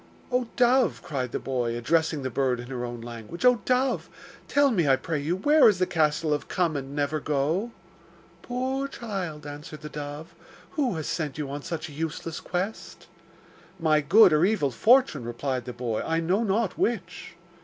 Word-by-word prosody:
'Oh 250 -1 +1
dove!' 250 0 +3
cried 135 -8 -3
the - - -1
boy, 120 -3 -2
addressing 155 +3 +1
the 130 - -3
bird 130 0 0
in 120 +1 -8
her 125 -2 -3
own 120 -1 -5
language, 120 - -6
'Oh 250 -3 +5
dove! 255 +1 +1 0.4
tell 285 -1 +3
me, 175 -9 +2
I 135 - +6
pray 155 +3 -3
you, 155 +5 -1
where 290 +8 +6
is 205 - +1
the 185 - +2
castle 155 -2 +1
of 145 - -3
Come 170 -4 0
and 140 0 -5
never 145 +1 0
go?' 150 +10 0 0.7
'Poor 260 +2 -2
child,' 190 - -5
answered 150 +2 -8
the 150 - -7
dove, 150 +3 -7 0.4
'who 270 - 0
has 155 -2 -4
sent 150 -5 -3
you 145 -3 -4
on 145 +1 -4
such 165 +1 -5
a - - -11
useless 160 +1 -4
quest?' 185 +5 -4 0.7
'My 155 -2 +3
good 185 +4 +6
or 155 +2 +4
evil 185 -9 +2
fortune,' 230 - +4
replied 125 +1 -3
the 125 - -5
boy, 120 -3 -2
'I 165 0 0
know 185 +7 +1
not 210 -1 0
which. 180 -9 -2
160 Hz, 185 wpm, -26 LUFS, 140-210 Hz, 0.7 s, I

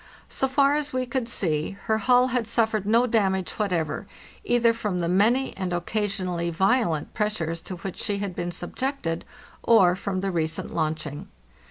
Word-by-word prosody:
So 270 - +1
far 275 +1 +3
as 295 0 -1
we 255 0 0
could 245 -1 -2
see, 165 -3 0
her 220 0 +1
hull 250 +3 +4
had 245 -3 -1
suffered 220 -3 +1
no 230 +3 +4
damage 195 -5 +1
whatever, 180 -7 -1 0.4
either 235 -1 +3
from 210 -5 -2
the 170 - 0
many 220 +9 +2
and 185 -2 -3
occasionally 180 -2 -1
violent 180 - +1
pressures 170 -6 -1
to 185 - -6
which 180 +1 -7
she 205 -2 -1
had 200 -3 -4
been 175 - -3
subjected, 175 - -3 0.4
or 190 -6 +5
from 190 -1 -3
the 195 0 -1
recent 160 -2 -2
launching. 155 -2 -3
200 Hz, 165 wpm, -25 LUFS, 175-235 Hz, 0.4 s, or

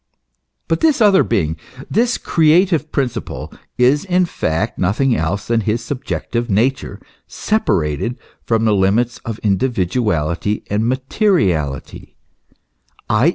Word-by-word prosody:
* 65 +1 -55
But 165 - 0
this 310 -5 +3
other 205 -4 +5
being, 80 0 -1 0.3
this 240 +2 +1
creative 165 0 +2
principle, 125 -5 -3 0.2
is 130 +4 +3
in 185 -1 +2
fact 80 - -2
nothing 115 +8 +1
else 95 +5 -2
than 115 -1 +1
his 115 +2 -2
subjective 120 -3 -3
nature 125 +6 0 0.3
separated 100 - -1 0.3
from 115 -1 +1
the 110 - +3
limits 105 +5 +1
of 115 -2 -6
individuality 100 - 0
and 105 +2 +1
materiality, 130 - -1 1.0
i. 115 +9 +4
115 Hz, 115 wpm, -18 LUFS, 95-150 Hz, 1.0 s, other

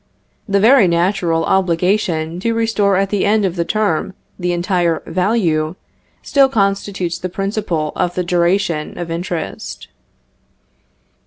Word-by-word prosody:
The 200 0 +3
very 225 0 +6
natural 170 -1 +1
obligation 175 -2 0
to 230 +4 -1
restore 225 -3 +1
at 195 0 0
the 205 -2 +1
end 210 0 +2
of 185 -2 -1
the 170 - 0
term 195 -1 -1 0.2
the 180 0 -1
entire 175 -2 0
value, 175 -4 0 0.5
still 275 -1 +3
constitutes 195 -5 -1
the 185 - -4
principle 190 -5 -2
of 175 - -1
the 180 - 0
duration 175 -2 0
of 175 -1 -5
interest. 170 0 -5
185 Hz, 130 wpm, -17 LUFS, 170-200 Hz, 0.5 s, very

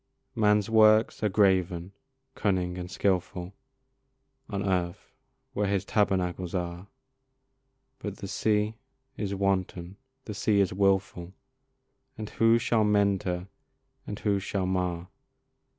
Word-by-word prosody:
Man's 105 -1 +3
works 110 -1 +4
are 105 - +2
graven, 95 -3 +2 0.4
cunning, 90 -3 0
and 90 0 -6
skilful 90 -1 -1 1.0
On 100 -1 -2
earth, 90 -2 -2 0.4
where 105 -2 0
his 100 -2 0
tabernacles 95 -3 0
are; 90 +1 -4 1.1
But 105 -2 -6
the 100 - -7
sea 105 +2 0 0.4
is 100 -4 -3
wanton, 95 -1 -1 0.3
the 105 - -5
sea 105 0 +1
is 95 -3 +2
wilful, 95 -2 0 0.8
And 110 -2 -6
who 115 0 +4
shall 115 -2 +1
mend 100 -2 +2
her 90 +1 -3 0.6
and 105 - -5
who 100 -2 0
shall 95 -1 -2
mar? 90 -1 -2
100 Hz, 120 wpm, -28 LUFS, 90-105 Hz, 1.1 s, works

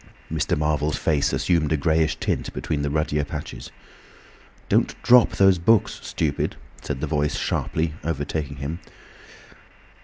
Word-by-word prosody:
Mr. - - 0
Marvel's 75 0 0
face 75 -3 +1
assumed 85 -4 +1
a 80 - +3
greyish 80 +1 +2
tint - - -2
between 75 - -2
the 70 - -1
ruddier 75 0 0
patches. - - -7 1.0
"Don't - - +2
drop 125 -1 +6
those 95 -2 +4
books, 110 +5 +2
stupid," 75 -3 -2 0.3
said 70 -2 -4
the - - 0
Voice, 75 -1 0
sharply—overtaking 80 -2 -2
him. 75 +4 -4
75 Hz, 125 wpm, -24 LUFS, 75-80 Hz, 1.0 s, drop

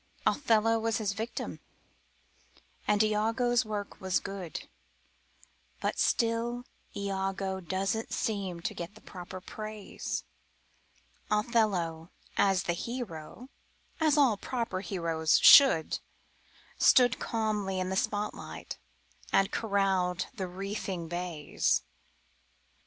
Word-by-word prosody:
Othello 225 -4 +3
was 225 0 0
his 205 -3 -1
victim 225 +3 -4 1.3
and 210 0 +4
Iago's 225 +3 +2
work 210 -2 -5
was 190 -1 +1
good, 195 -4 -6 1.1
But - - -2
still 235 +1 +1 0.3
Iago 195 -1 -2
doesn't 195 +5 -2
seem 195 -5 -2
to - - -2
get 175 +4 -7
the 215 - -15
proper 180 0 -8
praise; 215 +2 -5 1.1
Othello, 205 -7 +1 0.3
as 195 -2 +3
the 175 - 0
hero 235 +1 -6 0.5
as 310 -2 +3
all 260 -8 +5
proper 230 -4 -3
heroes 165 -4 +1
should 265 - +7 0.8
Stood 250 -2 +5
calmly 210 -4 -1
in 185 0 -1
the 190 - -1
spotlight 205 +2 -3 0.5
and 195 - +3
corralled 190 -4 +1
the 195 -7 -4
wreathing 190 -2 -4
bays. 175 -4 0
200 Hz, 100 wpm, -30 LUFS, 185-225 Hz, 1.3 s, should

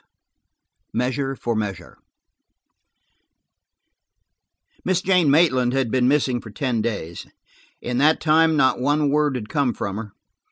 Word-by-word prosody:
CHAPTER - - -44
XXV - - -56
MEASURE 135 +2 -1
FOR 120 -2 -3
MEASURE 105 -3 -5 2.9
MISS 185 -1 0
JANE 180 -5 +3
MAITLAND 130 -5 +3
had 135 -4 -1
been 125 -1 +2
missing 130 -3 +1
for 110 - -11
ten 120 +1 -2
days. 100 -7 -5 0.6
In 125 0 -2
that 155 +3 +3
time, 160 0 +3
not 130 -3 +2
one 145 +1 +1
word 150 -2 +1
had 110 -4 -5
come 140 -4 -1
from 100 0 -4
her. 110 -2 -8
130 Hz, 135 wpm, -22 LUFS, 120-150 Hz, 2.9 s, JANE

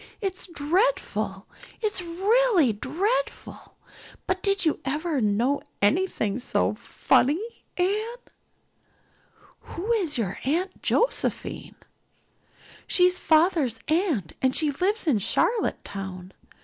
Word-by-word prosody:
It's 385 -3 -3
dreadful 355 +10 0 0.3
it's 420 -4 -1
really 375 - +3
dreadful 395 - -3 0.5
but 370 0 -1
did 395 -2 +1
you 315 - +1
ever 300 +1 -1
know 230 +7 +1 0.2
anything 225 - +1
so 95 - +1
funny, 325 - 0
Anne?" 430 +7 -1 1.3
"Who 390 +7 -5
is 365 - +1
your 200 -6 -2
Aunt 350 +8 -1
Josephine?" 485 - -1 1.1
"She's 360 0 +4
father's 315 - +3
aunt 310 - 0
and 260 0 +2
she 305 -2 +3
lives 380 +9 -1
in 275 -10 +3
Charlottetown. 190 - -2
335 Hz, 95 wpm, -25 LUFS, 260-395 Hz, 1.3 s, She's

